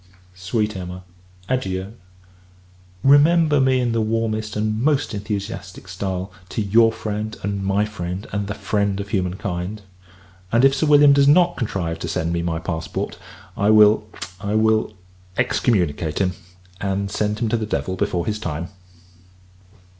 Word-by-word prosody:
Sweet 105 +4 -2
Emma, 90 0 -7 0.4
adieu! 95 -6 -2 1.1
Remember 150 +1 +5
me 130 -1 +3
in 120 -2 0
the 115 0 +1
warmest 110 -1 -1
and 110 +1 -1
most 145 -1 +1
enthusiastic 100 -2 -5
stile, 95 0 -4 0.2
to - - -4
your 115 +3 +4
friend, 110 0 -4
and 100 0 -2
my 100 +2 +1
friend, 95 -1 -5
and 100 0 -2
the 100 - -4
friend 100 -2 -1
of 100 0 -5
human 90 -3 -1
kind. 95 +2 -4 0.7
If 135 +4 +5
Sir 155 +3 0
William 145 -1 +7
does 140 0 +4
not 175 +4 +5
contrive 85 -7 -3
to 85 - -4
send 80 +1 -1
me 85 - 0
my 85 -1 -1
passport, 80 -1 -4 0.4
I 100 +1 +1
will 105 0 +6 0.3
I 100 +1 -2
will 110 0 +2 0.4
excommunicate 85 -8 +1
him, 95 -2 +1 0.5
and 100 0 -2
send 105 0 -1
him 115 - -1
to 115 - +1
the 110 -1 -3
devil 95 -3 -2
before 90 -3 -1
his 105 -1 -2
time. 85 -4 -4
105 Hz, 150 wpm, -21 LUFS, 95-115 Hz, 1.1 s, William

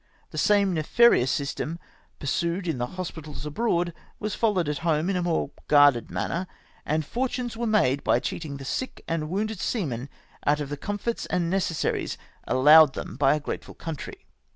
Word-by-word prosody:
The - - -8
same 200 -3 +3
nefarious 160 - +4
system 145 +4 -2 0.4
pursued 170 +6 -1
in 160 -7 -1
the 120 - -1
hospitals 155 -6 -6
abroad 175 +1 0 0.3
was 215 0 -3
followed 200 -8 +1
at 150 -1 -2
home 165 +2 +1
in - - -1
a 180 - 0
more 165 -5 0 0.2
guarded 145 -5 +5
manner, 180 +2 -2 0.4
and 155 +1 +1
fo7'tunes 245 - -2
ivere 235 +1 -2
made 140 -11 +2
by - - +3
cheating 150 -4 -4
the 135 - -9
sick 260 - -4
and 160 -2 -2
wounded 210 +3 -2
seamen 140 - -2 0.3
out 150 +1 +2
of 145 -2 -4
the 145 - -4
comforts 205 +7 -3
and 170 -1 0
necessaries 185 -4 -1 0.3
allowed 150 +2 +7
them - - -6
by 140 +2 +4
a - - -2
grateful 150 - -6
country. 160 -4 -7
165 Hz, 170 wpm, -26 LUFS, 145-195 Hz, 0.4 s, allowed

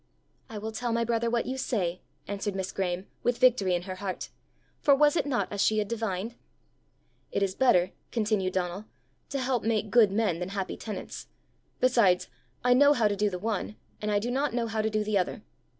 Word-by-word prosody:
"I 220 - -6
will 220 +2 -4
tell 240 +2 -2
my 230 0 +1
brother 230 0 0
what 235 0 0
you 265 +1 -3
say," 185 -9 -1 0.3
answered 200 0 -3
Miss 190 0 -3
Graeme, 185 -1 -2 0.2
with 245 0 +1
victory 230 -8 +4
in 175 - -2
her 185 0 -6
heart 190 -1 -5 0.5
for 280 - +5
was 295 +2 +4
it 305 - +1
not 260 -4 -1
as 205 -1 -1
she 215 - +3
had 210 -1 +1
divined? 225 -1 -3 1.0
"It - - 0
is 190 -1 0
better," 185 -7 +3 0.2
continued 210 -5 0
Donal, 185 +2 -2 0.4
"to 280 - -2
help 255 -3 0
make 215 -2 0
good 225 -5 +6
men 200 -5 +1
than 180 +1 -3
happy 195 -1 -3
tenants. 215 - -7 0.5
Besides, 230 -8 +3 0.3
I 250 0 +5
know 285 +3 +6
how 230 -6 +3
to 205 - 0
do 205 +1 +1
the 180 - -4
one, 210 +1 -3 0.3
and 210 - -2
I 205 - +2
do 230 +4 -1
not 275 0 0
know 240 -1 +1
how 220 -1 -1
to 220 - 0
do 215 0 0
the 210 -1 +1
other. 180 - -3
215 Hz, 210 wpm, -28 LUFS, 195-240 Hz, 1.0 s, good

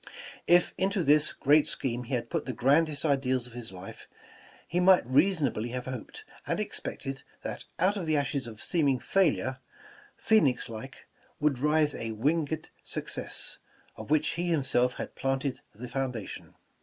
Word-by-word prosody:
If 175 0 +5
into 195 0 +1
this 150 0 +5
great 150 +2 +4
scheme 125 -2 -3
he 130 - -1
had 120 -1 -4
put 165 -4 -2
the 130 - -2
grandest 145 +5 +2
ideals 130 -4 +1
of 125 - -9
his 120 -3 -7
life, 95 0 -10 0.6
he 175 - 0
might 185 -4 +6
rea 140 +9 +4
sonably 130 - -1
have 125 -1 -4
hoped 130 -3 -7 0.2
and - - 0
expected 135 0 -4 0.2
that - - -5
out 190 +4 +2
of 175 -5 -4
the 155 -1 +3
ashes 140 -2 -1
of 110 -2 -7
seeming 145 -6 +2
failure, 140 -4 +1 0.6
phoenix 145 - +3
like, 115 +4 -9 0.3
would 150 -4 +1
rise 150 +1 +3
a 115 -1 -4
winged 155 +6 -1
suc - - -5
cess, - - -2 0.4
of - - -9
which 155 0 +3
he 175 +1 -2
himself 130 -5 +2
had - - -6
planted 135 0 -2
the 125 +4 -7
foundation. 125 -4 -4
135 Hz, 165 wpm, -29 LUFS, 125-155 Hz, 0.6 s, might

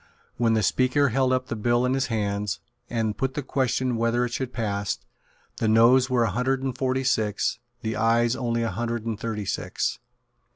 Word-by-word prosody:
When 115 -1 +3
the 110 - +1
Speaker 130 +7 +3
held 130 +2 +2
up 130 0 +1
the 115 - -4
bill 120 +3 +2
in 125 - +1
his 135 -1 0
hands, 100 -5 -1 0.3
and 110 -3 -1
put 130 0 -2
the 145 - -2
question 130 -1 0
whether 115 +1 +1
it 120 - -5
should 130 -1 -3
pass, 105 -4 -2 0.6
the 110 - 0
Noes 120 +4 +5
were 125 -2 +3
a 115 - +1
hundred 130 +5 0
and 130 -2 -2
forty 130 0 0
six, 110 -2 0 0.2
the 110 0 -2
Ayes 115 +1 +2
only 115 -2 -1
a 115 - -1
hundred 115 +3 -3
and 110 -2 -3
thirty 110 -2 -3
six. - - -2
120 Hz, 195 wpm, -25 LUFS, 110-130 Hz, 0.6 s, Noes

